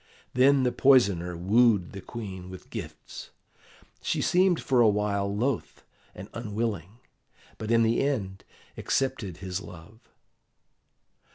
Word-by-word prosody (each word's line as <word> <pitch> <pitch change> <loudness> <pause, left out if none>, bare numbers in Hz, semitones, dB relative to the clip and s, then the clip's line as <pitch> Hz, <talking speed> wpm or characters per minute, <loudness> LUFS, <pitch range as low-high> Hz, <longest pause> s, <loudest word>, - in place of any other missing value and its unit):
Then 135 +2 +4
the 125 - +2
poisoner 100 -12 +3
wooed 105 +1 +3
the 100 - -8
Queen 95 -5 -8
with 95 0 -12
gifts. - - -8 0.7
She - - -1
seemed 180 -1 +3
for 130 -4 +2
a 115 - +6
while 100 -1 0
loath 115 +5 -2 0.3
and 95 +2 -9
unwilling, 110 -4 -4 0.6
but 110 - -5
in 115 0 +4
the 115 +1 +2
end 105 -9 -2 0.3
accepted 105 -9 -2
his 95 0 -5
love. 90 +4 -13
105 Hz, 120 wpm, -27 LUFS, 95-125 Hz, 0.7 s, a